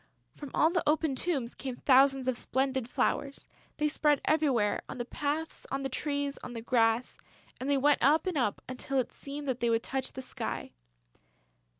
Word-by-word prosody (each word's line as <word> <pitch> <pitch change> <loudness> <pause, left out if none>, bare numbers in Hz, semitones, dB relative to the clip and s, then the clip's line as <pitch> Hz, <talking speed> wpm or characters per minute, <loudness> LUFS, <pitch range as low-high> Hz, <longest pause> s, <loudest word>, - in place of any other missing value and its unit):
From 290 - -8
all 320 - +4
the 350 -1 +1
open 310 -1 +2
tombs 265 -4 -2
came 260 -2 -5
thousands 270 0 +4
of 255 - +2
splendid 260 -1 -1
flowers. 275 +2 -1 0.3
They 300 - +2
spread 295 -1 +2
everywhere, 275 -9 +2
on - - -6
the 240 - -3
paths, 300 +5 -3
on 275 0 -2
the 270 - -1
trees, 285 +1 -2
on 245 - -6
the 230 - -5
grass; 230 0 +2 0.4
and 260 - -3
they 285 - +3
went 290 +2 +3
up 300 +6 +4
and 370 -3 -1
up 245 -8 0
until 255 +1 -3
it 255 - 0
seemed 285 +1 -7
that 255 -2 -1
they 235 - +1
would 230 0 +2
touch 265 -1 -2
the 260 - -6
sky. - - -5
270 Hz, 190 wpm, -30 LUFS, 250-295 Hz, 0.4 s, all